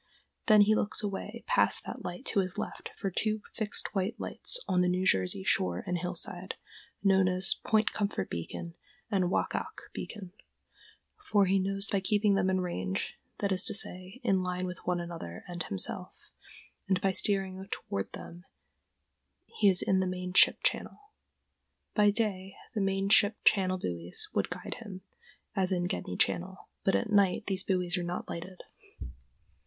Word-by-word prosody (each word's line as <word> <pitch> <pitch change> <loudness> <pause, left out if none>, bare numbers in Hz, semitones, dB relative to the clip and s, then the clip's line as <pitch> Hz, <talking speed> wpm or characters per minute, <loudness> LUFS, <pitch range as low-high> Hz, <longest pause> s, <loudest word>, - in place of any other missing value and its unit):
Then 215 -2 +8
he 210 +1 +6
looks 215 0 0
away 200 -2 -4
past - - +3
that - - -6
light 175 - -6
to - - +2
his 185 0 -1
left 215 - -5
for 195 -3 -2
two 215 +3 -1
fixed 215 -2 -3
white 195 +2 -1
lights - - -2
on 180 -1 +3
the 180 - +3
New 185 +1 +1
Jersey 95 - +2
shore 90 -2 +1
and 180 - -1
hillside, 180 +1 -3 0.5
known 190 -1 +5
as 185 +1 +4
Point 220 0 +2
Comfort 200 - -1
Beacon 85 - -5 0.4
and 190 -3 +3
Waackaack - - -2
Beacon, 195 -5 -7 0.9
for 205 - +4
he 195 +1 +3
knows 195 +2 +1
that 200 - +2
by - - +2
keeping 205 +1 +3
them 195 -1 +2
in 185 0 +2
range, 95 - -3 0.2
that 200 - -1
is 185 - +1
to - - 0
say, 185 +3 -3
in 195 -5 +3
line 180 0 -2
with 180 -1 -5
one 180 -1 +1
another 165 - -6
and 175 -1 -5
himself, 95 -12 -1 0.8
and 190 -1 +2
by 195 0 +2
steering 190 -1 -1
toward 100 - -4
them 175 +2 -9 1.0
he 205 - +3
is 185 -2 +3
in 190 - +3
the 185 - +1
main 180 0 -4
ship - - +5
channel. 415 0 -2 0.8
By 210 -1 +5
day 200 -3 -1 0.2
the 215 - 0
main 195 0 +1
ship 210 0 +5
channel 185 -2 +4
buoys 85 - -2
would - - +1
guide - - -6
him, 200 -5 -8 0.5
as 190 -1 +1
in 175 -1 +1
Gedney 90 - -3
Channel, 185 +2 -1 0.2
but 195 - +3
at 225 - 0
night 200 -3 +3
these 190 -1 0
buoys 180 -1 +1
are - - -2
not 175 +1 -3
lighted. 180 +2 -7
190 Hz, 170 wpm, -31 LUFS, 180-200 Hz, 1.0 s, Then